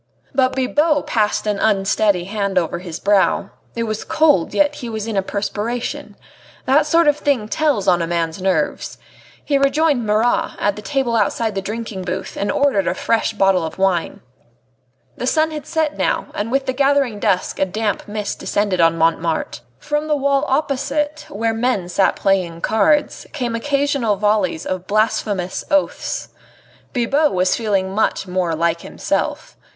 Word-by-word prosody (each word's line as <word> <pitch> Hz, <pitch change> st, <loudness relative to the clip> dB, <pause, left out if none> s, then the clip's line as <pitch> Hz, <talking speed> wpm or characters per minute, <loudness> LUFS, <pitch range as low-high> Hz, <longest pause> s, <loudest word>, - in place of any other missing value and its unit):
But 260 Hz, -1 st, +2 dB
Bibot 290 Hz, +3 st, +1 dB
passed 215 Hz, -2 st, 0 dB
an 210 Hz, -2 st, -1 dB
unsteady 200 Hz, -2 st, +2 dB
hand 200 Hz, 0 st, -2 dB
over 175 Hz, -1 st, 0 dB
his 175 Hz, -3 st, -7 dB
brow. 200 Hz, -1 st, +2 dB, 0.2 s
It 230 Hz, -, -1 dB
was 215 Hz, -1 st, -3 dB
cold, 295 Hz, -, +2 dB
yet 295 Hz, 0 st, +2 dB
he 240 Hz, -, -6 dB
was 220 Hz, -2 st, -4 dB
in 225 Hz, -2 st, -4 dB
a 195 Hz, -, +2 dB
perspiration. 210 Hz, +4 st, -4 dB, 0.5 s
That 295 Hz, +3 st, +3 dB
sort 330 Hz, +1 st, +4 dB
of 295 Hz, 0 st, +4 dB
thing 280 Hz, -8 st, 0 dB
tells 280 Hz, -5 st, 0 dB
on 175 Hz, -2 st, +4 dB
a 165 Hz, -, -1 dB
man's 170 Hz, +1 st, -2 dB
nerves. 185 Hz, -5 st, -1 dB, 0.5 s
He 280 Hz, -2 st, +2 dB
rejoined 280 Hz, -1 st, +2 dB
Marat, 215 Hz, +3 st, +1 dB
at 205 Hz, -1 st, 0 dB
the 210 Hz, -, -8 dB
table 265 Hz, -1 st, -1 dB
outside 220 Hz, +1 st, 0 dB
the 195 Hz, -, -2 dB
drinking 215 Hz, -1 st, -5 dB
booth, 185 Hz, +1 st, -4 dB
and 200 Hz, -, -1 dB
ordered 275 Hz, -9 st, +2 dB
a -, -, 0 dB
fresh 225 Hz, 0 st, 0 dB
bottle 195 Hz, -4 st, +2 dB
of 160 Hz, -, -5 dB
wine. 190 Hz, -3 st, 0 dB, 1.0 s
The 250 Hz, -, -3 dB
sun 315 Hz, +3 st, +2 dB
had 300 Hz, -2 st, -7 dB
set 315 Hz, -2 st, -1 dB
now, -, -, 0 dB
and 210 Hz, +3 st, -3 dB
with 270 Hz, +1 st, +1 dB
the 260 Hz, -, -1 dB
gathering 275 Hz, -4 st, +1 dB
dusk 195 Hz, -3 st, 0 dB
a -, -, +3 dB
damp 210 Hz, +2 st, -2 dB
mist 210 Hz, -1 st, -4 dB
descended 200 Hz, -3 st, 0 dB
on 165 Hz, 0 st, +4 dB
Montmartre. 165 Hz, 0 st, 0 dB, 0.2 s
From 295 Hz, -, -2 dB
the 300 Hz, -1 st, +1 dB
wall 280 Hz, +1 st, +1 dB
opposite, 290 Hz, +2 st, -1 dB
where 225 Hz, +3 st, -1 dB
the 225 Hz, -, -5 dB
men 230 Hz, -7 st, 0 dB
sat 190 Hz, +2 st, +2 dB
playing 180 Hz, -4 st, 0 dB
cards, 285 Hz, +8 st, +1 dB
came 245 Hz, -6 st, -2 dB
occasional 280 Hz, -3 st, 0 dB
volleys 200 Hz, -5 st, 0 dB
of 185 Hz, -1 st, -4 dB
blasphemous 205 Hz, -3 st, 0 dB
oaths. 295 Hz, -2 st, -1 dB, 0.6 s
Bibot 280 Hz, +4 st, +1 dB
was 185 Hz, 0 st, +2 dB
feeling 195 Hz, -4 st, 0 dB
much 210 Hz, -2 st, 0 dB
more 180 Hz, -3 st, -1 dB
like 170 Hz, +1 st, 0 dB
himself. -, -, -3 dB
215 Hz, 165 wpm, -19 LUFS, 190-275 Hz, 1.0 s, sort